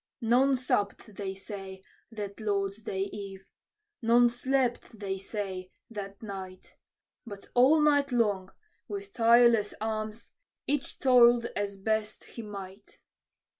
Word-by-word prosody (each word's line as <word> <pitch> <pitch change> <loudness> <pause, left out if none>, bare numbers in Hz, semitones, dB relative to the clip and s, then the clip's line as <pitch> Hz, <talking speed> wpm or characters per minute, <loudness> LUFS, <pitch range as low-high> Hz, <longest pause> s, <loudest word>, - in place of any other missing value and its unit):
None 250 +4 +4
supped, 215 -4 -1
they 195 -1 -4
say, 195 -1 -8 0.3
that 205 -2 -6
Lord's 200 -2 -1
day 190 -2 -2
eve; 195 -1 -7 0.6
none 240 +1 +5
slept, 245 -2 -1
they 195 -2 -3
say, 190 -2 -5 0.2
that 200 -1 -7
night; 190 -3 -8 0.5
But 200 -4 -10
all 265 +6 +6
night 285 -2 +3
long, 205 -6 +1 0.4
with 405 0 -6
tireless 235 -2 +5
arms, 215 +1 -4 0.3
each 285 -1 -2
toiled 240 -3 +6
as 200 -1 -2
best 215 +1 -2
he 235 - -9
might. 200 -1 -9
215 Hz, 120 wpm, -29 LUFS, 195-240 Hz, 0.6 s, all